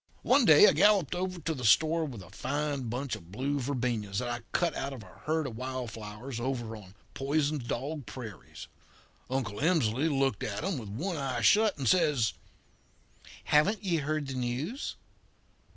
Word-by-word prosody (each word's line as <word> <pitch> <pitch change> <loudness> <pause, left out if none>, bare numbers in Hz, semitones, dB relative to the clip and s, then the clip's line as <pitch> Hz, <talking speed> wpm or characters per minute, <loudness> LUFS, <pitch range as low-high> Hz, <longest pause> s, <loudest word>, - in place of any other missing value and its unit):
"One 260 0 +4
day 155 -6 +9
I - - +7
galloped 195 -1 +4
over 180 0 -3
to 160 +1 -1
the 130 -4 -7
store 160 +8 +4
with 120 -10 -7
a 90 - -15
fine 145 -2 -2
bunch 125 +1 -2
of 90 -4 -13
blue 140 +7 -1
verbenas 120 -7 -2
that 120 +3 -1
I 120 0 -2
cut 170 -3 +1
out 140 +1 -3
of 125 -5 -9
a 95 - -16
herd 160 0 +1
of 120 - -5
wild 130 -1 -4
flowers 110 +3 -7
over 120 -3 -3
on 100 -3 -13 0.2
Poisoned 145 -1 0
Dog 140 +4 -3
Prairie. 115 -7 -9 0.7
Uncle 125 -5 -2
Emsley 145 -3 +2
looked 135 -6 +1
at 105 +5 -3
'em 185 -6 -1
with 110 -4 -8
one 165 - -3
eye 130 -4 -2
shut 210 - +4
and 135 -3 -2
says: 150 - +3 1.1
"'Haven't 195 +8 +3
ye 175 -4 +1
heard 155 0 -1
the 135 - -5
news?' 130 - -3
135 Hz, 175 wpm, -30 LUFS, 120-155 Hz, 1.1 s, day